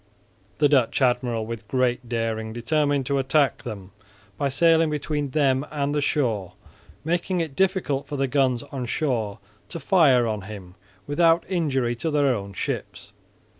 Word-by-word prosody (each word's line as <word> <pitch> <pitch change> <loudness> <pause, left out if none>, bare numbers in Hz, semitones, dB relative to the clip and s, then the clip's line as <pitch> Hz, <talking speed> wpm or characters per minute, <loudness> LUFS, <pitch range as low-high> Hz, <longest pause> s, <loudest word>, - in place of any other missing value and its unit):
The 150 - +4
Dutch 135 -5 +2
admiral 125 -3 +1
with 115 -1 -7
great 125 -1 0
daring 110 -1 -2
determined 145 +3 0
to 140 +2 0
attack 135 +1 +2
them 100 -6 -8 0.4
by 140 +6 -1
sailing 165 +3 +3
between 150 -1 -2
them 135 -2 +2
and 145 -1 -2
the 150 - 0
shore, 110 - -1 0.5
making 175 +3 -1
it 160 -5 -3
difficult 180 -8 0
for 145 -1 -4
the 135 - +1
guns 130 -3 +1
on 130 -3 -4
shore 115 -8 -1 0.3
to 170 - -6
fire 145 -10 +4
on 110 -2 -2
him 95 -3 -10 0.3
without 165 +4 +3
injury 135 -10 0
to 160 - -2
their 145 -3 +2
own 100 -3 -5
ships. - - -5
135 Hz, 155 wpm, -24 LUFS, 115-150 Hz, 0.5 s, The